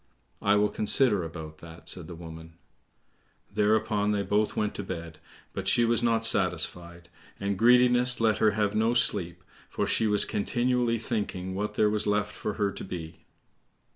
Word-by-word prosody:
"I 100 Hz, 0 st, +3 dB
will 105 Hz, 0 st, +2 dB
consider 105 Hz, -2 st, +2 dB
about 80 Hz, -1 st, -8 dB
that," 85 Hz, 0 st, -13 dB
said 85 Hz, -4 st, -1 dB
the 85 Hz, -, -8 dB
woman. 80 Hz, 0 st, -11 dB, 1.0 s
Thereupon 105 Hz, 0 st, +1 dB
they 100 Hz, -1 st, -1 dB
both 105 Hz, +1 st, 0 dB
went 105 Hz, -1 st, -1 dB
to 100 Hz, -, -5 dB
bed, 85 Hz, -4 st, -7 dB, 0.3 s
but -, -, -5 dB
she 120 Hz, -, +3 dB
was 115 Hz, 0 st, +2 dB
not 115 Hz, -1 st, +1 dB
satisfied, 85 Hz, -5 st, 0 dB, 0.3 s
and 100 Hz, 0 st, -2 dB
greediness 125 Hz, +2 st, +4 dB
let 110 Hz, -3 st, +2 dB
her 110 Hz, -, +4 dB
have 105 Hz, -1 st, +1 dB
no 110 Hz, +3 st, +1 dB
sleep, 90 Hz, -8 st, +1 dB, 0.3 s
for -, -, -2 dB
she 110 Hz, -, +1 dB
was 105 Hz, -1 st, +3 dB
continually 120 Hz, +2 st, 0 dB
thinking 100 Hz, -5 st, -4 dB
what 105 Hz, +3 st, -4 dB
there 105 Hz, -, +3 dB
was 105 Hz, 0 st, -1 dB
left 105 Hz, 0 st, 0 dB
for 105 Hz, -, -4 dB
her 100 Hz, -2 st, -1 dB
to 100 Hz, -, -8 dB
be. 85 Hz, -3 st, -8 dB
105 Hz, 170 wpm, -27 LUFS, 90-115 Hz, 1.0 s, greediness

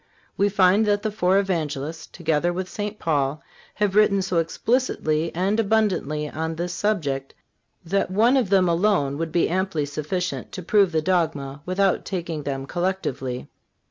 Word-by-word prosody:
We 200 Hz, +1 st, +2 dB
find 200 Hz, +2 st, +4 dB
that 205 Hz, 0 st, +1 dB
the 215 Hz, -, -1 dB
four 190 Hz, -2 st, +2 dB
Evangelists, 160 Hz, -5 st, -2 dB
together 165 Hz, 0 st, 0 dB
with 185 Hz, +1 st, -3 dB
St. 210 Hz, +2 st, -5 dB
Paul, 145 Hz, -3 st, -1 dB, 0.3 s
have 210 Hz, -2 st, +1 dB
written 200 Hz, -2 st, +4 dB
so 180 Hz, -2 st, -1 dB
explicitly 165 Hz, -4 st, 0 dB
and 195 Hz, +5 st, +1 dB
abundantly 195 Hz, -9 st, +1 dB
on 160 Hz, +2 st, -3 dB
this 175 Hz, +2 st, -3 dB
subject 145 Hz, -12 st, -1 dB, 0.5 s
that 195 Hz, +3 st, 0 dB
one 225 Hz, +7 st, +3 dB
of 250 Hz, -8 st, +2 dB
them 190 Hz, -2 st, +4 dB
alone 170 Hz, -5 st, +1 dB
would 165 Hz, -1 st, -2 dB
be 170 Hz, -, +2 dB
amply 185 Hz, -4 st, -1 dB
sufficient 155 Hz, +5 st, -3 dB
to 185 Hz, -, -6 dB
prove 200 Hz, 0 st, +3 dB
the 160 Hz, -1 st, 0 dB
dogma 150 Hz, -6 st, -1 dB
without 190 Hz, 0 st, +1 dB
taking 170 Hz, -5 st, -4 dB
them 135 Hz, -2 st, -4 dB
collectively. 155 Hz, -8 st, -3 dB
180 Hz, 155 wpm, -24 LUFS, 155-200 Hz, 0.5 s, find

